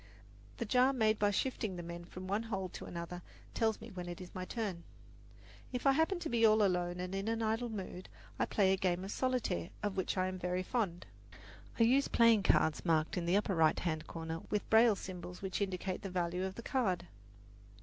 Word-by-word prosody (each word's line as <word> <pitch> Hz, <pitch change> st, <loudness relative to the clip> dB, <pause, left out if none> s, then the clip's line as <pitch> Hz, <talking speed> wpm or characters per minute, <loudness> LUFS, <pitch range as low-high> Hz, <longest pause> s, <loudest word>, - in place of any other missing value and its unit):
The 235 Hz, -, -2 dB
jar 255 Hz, +4 st, +4 dB
made 220 Hz, -4 st, +2 dB
by 205 Hz, -, +4 dB
shifting 215 Hz, -2 st, -1 dB
the 175 Hz, -, -6 dB
men 170 Hz, 0 st, -7 dB
from 185 Hz, +1 st, -9 dB
one 200 Hz, +3 st, 0 dB
hole 195 Hz, -5 st, -3 dB
to -, -, -8 dB
another 170 Hz, +1 st, -6 dB, 0.3 s
tells 220 Hz, -2 st, +1 dB
me 225 Hz, +1 st, -10 dB
when 180 Hz, -2 st, -6 dB
it 175 Hz, -, -6 dB
is 180 Hz, -1 st, -10 dB
my 185 Hz, -1 st, -4 dB
turn. 195 Hz, -6 st, -3 dB, 0.9 s
If 250 Hz, +1 st, -4 dB
I 275 Hz, -, +7 dB
happen 320 Hz, +7 st, +2 dB
to 330 Hz, -, -2 dB
be 235 Hz, -3 st, +1 dB
all 215 Hz, -1 st, +6 dB
alone 180 Hz, -2 st, +1 dB
and 180 Hz, +1 st, -4 dB
in 195 Hz, +2 st, -2 dB
an 225 Hz, 0 st, 0 dB
idle 225 Hz, +2 st, 0 dB
mood, 190 Hz, -3 st, -6 dB, 0.3 s
I -, -, +2 dB
play 190 Hz, -2 st, +3 dB
a -, -, +1 dB
game 185 Hz, -1 st, 0 dB
of 195 Hz, -, -5 dB
solitaire, 250 Hz, -, -1 dB
of 205 Hz, -2 st, -1 dB
which 190 Hz, -, -1 dB
I 185 Hz, -, +2 dB
am 185 Hz, 0 st, -4 dB
very 180 Hz, +1 st, -1 dB
fond. 190 Hz, -6 st, -2 dB, 0.7 s
I -, -, +6 dB
use 265 Hz, +5 st, +4 dB
playing 230 Hz, -3 st, +5 dB
cards 160 Hz, -5 st, +3 dB
marked 160 Hz, -2 st, +1 dB
in 170 Hz, -1 st, -2 dB
the 180 Hz, +3 st, +4 dB
upper 205 Hz, -1 st, 0 dB
right 160 Hz, -3 st, +4 dB
hand 155 Hz, -3 st, -2 dB
corner 165 Hz, 0 st, -5 dB
with 210 Hz, -, -1 dB
braille 220 Hz, -1 st, +6 dB
symbols 180 Hz, -1 st, -8 dB
which 190 Hz, +1 st, -2 dB
indicate 190 Hz, -1 st, -2 dB
the 195 Hz, -, -5 dB
value 180 Hz, 0 st, -1 dB
of 190 Hz, 0 st, -5 dB
the 235 Hz, -, -8 dB
card. 195 Hz, -11 st, 0 dB
190 Hz, 215 wpm, -34 LUFS, 180-225 Hz, 0.9 s, I